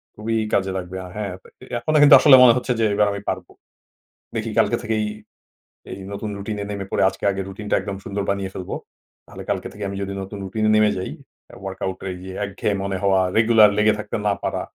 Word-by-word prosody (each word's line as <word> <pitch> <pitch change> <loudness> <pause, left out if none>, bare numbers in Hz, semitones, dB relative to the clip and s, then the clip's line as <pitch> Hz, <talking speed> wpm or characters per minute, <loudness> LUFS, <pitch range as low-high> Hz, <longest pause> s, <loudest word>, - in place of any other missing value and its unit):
খুবই 115 +2 -3 0.2
কাজে 95 -1 +1
লাগবে। 95 0 -6
আ - - -8
হ্যাঁ, 105 -3 -3 0.3
এ - - -10
এখনো 155 +4 +1
কিন্তু 145 -1 +10
আসলে 145 -3 +8
মনে 120 - +8
হচ্ছে 125 - -2
যে, 115 - +3
"এবার 105 0 +3
আমি 100 0 -5
পারব।" 95 -1 -3 0.9
দেখি, - - -2
কালকে - - +3
থেকেই 110 -1 -1 0.9
এই - - -7
নতুন 105 +1 -4
রুটিনে 100 0 -4
নেমে 100 -1 -4
পড়ে, - - +2
আজকে - - -14
আগে 95 - -3
রুটিনটা 105 +1 -2
একদম 100 -1 -5
সুন্দর 100 0 -3
বানিয়ে 100 -1 -1
ফেলব। 90 - -7 0.5
তাহলে - - -10
কালকে - - -1
থেকে 105 - -7
আমি 100 - -5
যদি 100 0 -4
নতুন 95 +2 -7
রুটিনে 110 +3 0
নেমে 105 -1 +4
যাই, 95 - -4 0.4
অ্যা - - -15
ওয়ার্কআউটে 95 0 -5
গিয়ে 95 0 -8
একঘেয়ে 100 +1 -2
মনে 100 -1 -2
হওয়া, 95 -1 +3 0.2
রেগুলার 110 -2 +6
লেগে 105 0 +4
থাকতে - - -5
না 100 - +3
পারা, - - -2
100 Hz, 205 wpm, -22 LUFS, 95-110 Hz, 0.9 s, কিন্তু